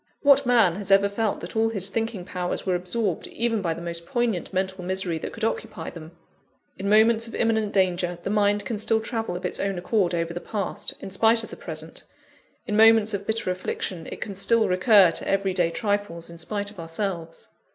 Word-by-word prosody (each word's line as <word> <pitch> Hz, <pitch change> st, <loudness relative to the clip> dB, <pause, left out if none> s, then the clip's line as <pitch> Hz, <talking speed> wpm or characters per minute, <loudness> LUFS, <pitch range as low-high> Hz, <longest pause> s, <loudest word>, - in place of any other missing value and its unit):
What 280 Hz, -2 st, +5 dB
man 225 Hz, -8 st, +4 dB
has 205 Hz, -1 st, -6 dB
ever 195 Hz, 0 st, +5 dB
felt 210 Hz, +1 st, -2 dB
that 175 Hz, -, -8 dB
all 225 Hz, 0 st, +2 dB
his 200 Hz, -3 st, -1 dB
thinking 225 Hz, -3 st, -3 dB
powers 180 Hz, -1 st, -3 dB
were 185 Hz, -, +1 dB
absorbed, 180 Hz, +1 st, -2 dB
even 230 Hz, -2 st, -1 dB
by 165 Hz, -3 st, -1 dB
the 170 Hz, -, -8 dB
most 170 Hz, 0 st, -4 dB
poignant 235 Hz, -6 st, -1 dB
mental 190 Hz, -1 st, -2 dB
misery 185 Hz, -2 st, -1 dB
that -, -, -5 dB
could 225 Hz, -, -8 dB
occupy 225 Hz, -, -3 dB
them? 160 Hz, 0 st, -11 dB, 0.7 s
In 195 Hz, +1 st, -2 dB
moments 220 Hz, +2 st, +4 dB
of 230 Hz, -, -8 dB
imminent 220 Hz, -2 st, +1 dB
danger, 180 Hz, -3 st, +1 dB
the -, -, -2 dB
mind 205 Hz, 0 st, +2 dB
can 225 Hz, -3 st, -3 dB
still 220 Hz, +1 st, +3 dB
travel 225 Hz, -4 st, -3 dB
of 180 Hz, -, -5 dB
its -, -, -3 dB
own 195 Hz, -1 st, -1 dB
accord 180 Hz, -1 st, +1 dB
over 165 Hz, 0 st, -2 dB
the 175 Hz, -, -5 dB
past, 200 Hz, -4 st, -3 dB
in 195 Hz, -, -7 dB
spite 225 Hz, +3 st, +3 dB
of -, -, -9 dB
the -, -, -7 dB
present -, -, -7 dB, 0.6 s
in 210 Hz, -, -2 dB
moments 220 Hz, 0 st, +6 dB
of 200 Hz, 0 st, -4 dB
bitter 220 Hz, -4 st, 0 dB
affliction, 180 Hz, -2 st, -4 dB
it -, -, -8 dB
can 205 Hz, -, -4 dB
still 220 Hz, +4 st, +3 dB
recur 185 Hz, 0 st, +5 dB
to -, -, -5 dB
every 195 Hz, -1 st, +1 dB
day 175 Hz, -2 st, +2 dB
trifles, 205 Hz, -5 st, -2 dB
in 170 Hz, -, -11 dB
spite 205 Hz, +3 st, -3 dB
of 205 Hz, -, -14 dB
ourselves. 165 Hz, 0 st, -5 dB
200 Hz, 210 wpm, -25 LUFS, 180-220 Hz, 0.7 s, moments